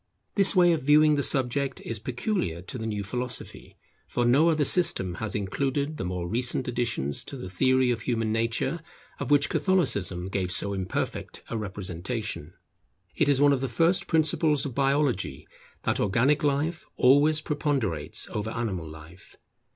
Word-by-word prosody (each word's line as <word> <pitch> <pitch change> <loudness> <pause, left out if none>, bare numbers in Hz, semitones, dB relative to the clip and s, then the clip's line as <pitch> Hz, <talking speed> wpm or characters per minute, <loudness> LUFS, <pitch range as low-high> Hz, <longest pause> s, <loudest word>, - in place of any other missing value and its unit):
This 195 0 +4
way 175 -1 +6
of 160 - -1
viewing 150 +2 +5
the 145 - +1
subject 135 0 0
is 115 -2 -4
peculiar 120 - -2
to 125 +6 -7
the 110 - -4
new 105 -2 -3
philosophy, 125 +3 -4 0.3
for 120 - -1
no 140 +8 +4
other 155 -3 +2
system 160 - +3
has 110 - -3
included 140 +9 -2
the - - -4
more 90 -1 -3
recent 125 +5 -1
additions 115 - -2
to 140 - -7
the 95 -7 -7
theory 130 +5 +2
of 115 -2 -2
human 115 -2 -1
nature, 115 +8 0 0.4
of - - -4
which 145 -1 +4
Catholicism 100 - +1
gave 95 -2 -2
so 100 +1 -2
imperfect 95 -1 -4
a - - -2
representation. 95 -2 -4 0.6
It - - +2
is 140 -2 +3
one 145 0 +5
of 130 - -1
the 135 - -2
first 170 +9 +2
principles 155 -2 +2
of 135 - -4
Biology 135 - 0 0.4
that - - 0
organic 125 +10 +2
life 150 +3 0
always 145 +4 +5
preponderates 140 - -1
over 105 +1 -3
animal 100 -9 -3
life. 80 +3 -14
125 Hz, 160 wpm, -26 LUFS, 100-145 Hz, 0.6 s, way